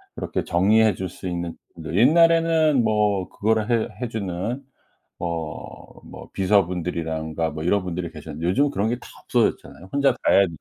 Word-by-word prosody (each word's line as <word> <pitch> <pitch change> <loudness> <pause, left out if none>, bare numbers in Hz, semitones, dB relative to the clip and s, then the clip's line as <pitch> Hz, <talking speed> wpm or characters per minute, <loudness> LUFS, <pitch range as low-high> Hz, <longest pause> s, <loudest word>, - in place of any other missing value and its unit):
그렇게 - - -3
정리해 105 +5 +4
줄 95 -1 -4
수 95 - -8
있는 85 -1 -4 0.3
옛날에는 160 - +4
뭐 105 -4 +1
그거를 110 +1 0
해 115 -2 +1
해 125 - -1
주는 110 +4 -4 0.6
어 85 -2 -6
뭐 - - -11
비서분들이라든가 85 -4 0
뭐 80 +1 -6
이런 100 +3 +2
분들이 90 -1 -4
계셨는데 80 0 -6
요즘은 140 +11 +2
그런 105 -5 -1
게 120 - 0
다 - - -13 0.2
없어졌잖아요. 95 +2 -1
혼자 140 -1 +3
다 125 - -13
해야 100 - +6
95 Hz, 340 characters per minute, -23 LUFS, 85-115 Hz, 0.6 s, 해야